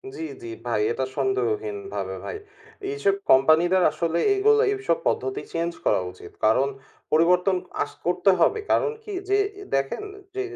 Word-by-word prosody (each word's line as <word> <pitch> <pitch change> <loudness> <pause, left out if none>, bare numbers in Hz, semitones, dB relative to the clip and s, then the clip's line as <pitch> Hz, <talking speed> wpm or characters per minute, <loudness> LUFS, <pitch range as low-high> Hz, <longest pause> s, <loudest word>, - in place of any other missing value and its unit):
জি, - - -7 0.2
জি। - - -6 0.2
ভাই 115 -3 0
এটা 130 - -2
সন্দেহহীনভাবে 410 0 -2
ভাই। 435 - -4 0.5
এইসব 405 -1 +1
কোম্পানিদের 165 +7 +5
আসলে 170 0 -1 0.2
এগুলো, 435 +2 +4
এইসব 400 +3 0
পদ্ধতি 395 +1 -1
চেঞ্জ 170 +1 -1
করা - - +3
উচিত। 90 -1 -13
কারণ, 125 +5 +4 0.4
পরিবর্তন 180 +4 +4 0.3
আঁচ - - -9
করতে 180 +3 +3
হবে। 440 - +3
কারণ 450 - +3
কি 425 - -8 0.2
যে 400 - +4 0.2
এ - - -7
দেখেন 135 - -1 0.3
যে, 395 - -1
190 Hz, 150 wpm, -24 LUFS, -, 0.5 s, কোম্পানিদের